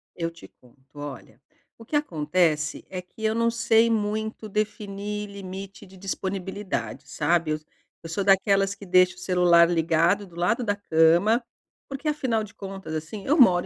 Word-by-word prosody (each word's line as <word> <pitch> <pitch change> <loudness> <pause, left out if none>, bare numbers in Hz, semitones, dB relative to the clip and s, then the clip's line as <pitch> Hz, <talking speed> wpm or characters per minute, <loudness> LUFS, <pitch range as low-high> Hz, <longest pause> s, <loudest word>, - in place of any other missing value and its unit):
Eu 165 -1 -2
te 170 0 -14
conto, 130 +3 -20
olha, 135 -4 -9 0.4
o 230 - -12
que 300 - -4
acontece 155 - 0
é 185 -1 -5
que 180 +4 -14
eu 220 - +2
não 230 +1 +2
sei 230 0 +3
muito 220 0 -2
definir 210 0 -3
limite 195 0 -8
de 190 +1 -16
disponibilidade, 190 +1 -4
sabe. 170 -2 +1
Eu 155 - -1 0.5
eu 165 - -6
sou 170 - -2
daquelas 195 0 +3
que 200 0 -12
deixa 185 0 +4
o - - -24
celular 175 -2 +4
ligado 170 +4 +2
do 170 - -17
lado 180 +8 +1
da 205 -4 0
cama, 180 +5 +3 0.5
porque 275 +3 -3
afinal 250 -7 0
de 210 0 -11
contas, 195 -5 -7
assim, 160 +6 -5
eu 300 +4 +2
moro 180 -8 +6
195 Hz, 165 wpm, -25 LUFS, 170-215 Hz, 0.5 s, moro